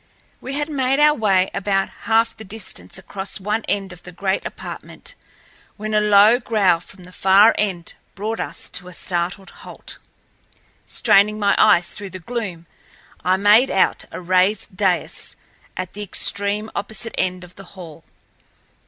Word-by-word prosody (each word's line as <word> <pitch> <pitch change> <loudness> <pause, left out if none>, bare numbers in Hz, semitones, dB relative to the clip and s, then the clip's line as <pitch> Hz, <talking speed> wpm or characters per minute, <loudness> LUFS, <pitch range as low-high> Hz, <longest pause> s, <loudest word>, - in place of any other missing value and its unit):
We 265 - -6
had 295 +1 -1
made 270 -2 0
our 300 0 +6
way 195 -7 +2
about 195 0 0 0.2
half 225 0 +3
the 220 - -10
distance 190 - -8
across 195 +1 -6
one 210 +3 -2
end 195 -2 -2
of 175 - -15
the 180 - -11
great 190 +2 -1
apartment - - -9 0.6
when 215 +1 -4
a 210 - +4
low 210 +3 +6
growl 210 -8 +2
from 185 +2 -15
the 180 - -13
far 195 +4 +5
end 185 -5 -2 0.2
brought 215 +3 -3
us - - -6
to 180 - -5
a 180 - -10
startled 180 +3 -3
halt. - - -9 0.9
Straining 210 +2 +3
my 200 -1 +2
eyes 175 0 +5
through 200 -1 -6
the 185 - -8
gloom, 185 -3 -5 0.6
I 185 +2 +3
made 210 +6 +5
out 190 - +2
a - - -6
raised 185 +3 +1
dais 185 -2 -1 0.4
at 185 -1 -5
the 210 - -7
extreme 205 +1 -2
opposite 220 +3 -4
end 185 0 -1
of 180 0 -13
the 195 - -12
hall. 165 -3 -10
200 Hz, 160 wpm, -21 LUFS, 185-215 Hz, 0.9 s, our